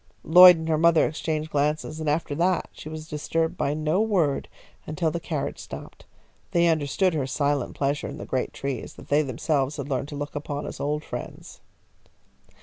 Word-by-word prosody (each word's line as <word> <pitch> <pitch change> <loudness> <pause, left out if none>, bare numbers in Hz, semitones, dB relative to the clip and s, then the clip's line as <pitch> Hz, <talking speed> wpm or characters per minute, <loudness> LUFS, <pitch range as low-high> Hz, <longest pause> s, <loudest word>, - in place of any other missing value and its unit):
Lloyd 180 +1 +9
and 160 0 -5
her 155 -1 +1
mother 165 -1 +5
exchanged 155 0 -3
glances, 150 +2 -1
and 155 -1 -1
after 150 0 -1
that 175 +4 +1
she 155 - -9
was 155 0 -7
disturbed 160 +2 -1
by 145 - -1
no 155 +5 +1
word 180 -11 +1 0.4
until 155 +1 -1
the 170 - -3
carriage 155 -3 -4
stopped. - - -10 0.5
They 170 0 +4
understood 160 +3 +1
her 140 -4 -1
silent 140 0 -1
pleasure 140 +1 -1
in - - -7
the - - -7
great 130 -1 -2
trees 135 -4 -5
that - - -14
they 145 +1 +4
themselves 140 +1 -1
had 140 0 -5
learned 135 0 -1
to 145 - -7
look 145 0 -5
upon 145 0 -4
as - - -7
old 150 +1 -1
friends. - - -8
150 Hz, 185 wpm, -25 LUFS, 145-160 Hz, 0.5 s, Lloyd